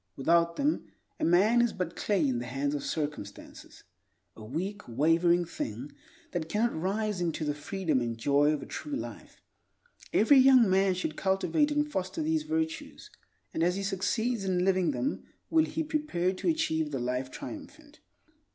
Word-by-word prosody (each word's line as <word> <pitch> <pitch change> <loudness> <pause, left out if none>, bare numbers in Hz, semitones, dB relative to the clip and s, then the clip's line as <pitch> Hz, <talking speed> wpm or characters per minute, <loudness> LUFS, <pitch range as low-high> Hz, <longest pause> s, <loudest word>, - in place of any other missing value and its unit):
Without 170 +4 +2
them, 290 +2 0 0.3
a - - -3
man 205 +8 +4
is 240 - +1
but 180 -3 -4
clay 190 -8 +1
in 125 -3 0
the 120 - -5
hands 140 +3 -2
of 145 - -3
circumstances; 145 -10 -6 0.5
a 110 - -11
weak, 185 - -4
wavering 165 +7 +3
thing 130 -4 -5 0.4
that 165 -3 -3
cannot 230 +5 0
rise 195 +3 -1
into 165 -2 -1
the 145 - 0
freedom 150 -1 -1
and 115 -1 -3
joy 145 +5 +3
of 150 -2 -2
a - - -8
true 295 -1 -5
life. - - -8 0.7
Every 265 +6 +6
young 260 -3 +7
man 190 0 +3
should 165 -4 -3
cultivate 195 - +1
and 295 0 +1
foster 245 - -3
these 320 0 +1
virtues, 320 +6 -4 0.4
and - - -2
as 175 +2 +2
he 200 - -3
succeeds 200 +4 -1
in 185 -1 +1
living 185 -2 +2
them 275 - -2 0.3
will 320 -1 +4
he 320 - -3
prepare 300 - -1
to 185 - -5
achieve 160 - 0
the 140 - -3
Life 125 +1 -2
Triumphant. - - -10
185 Hz, 170 wpm, -29 LUFS, 150-235 Hz, 0.7 s, young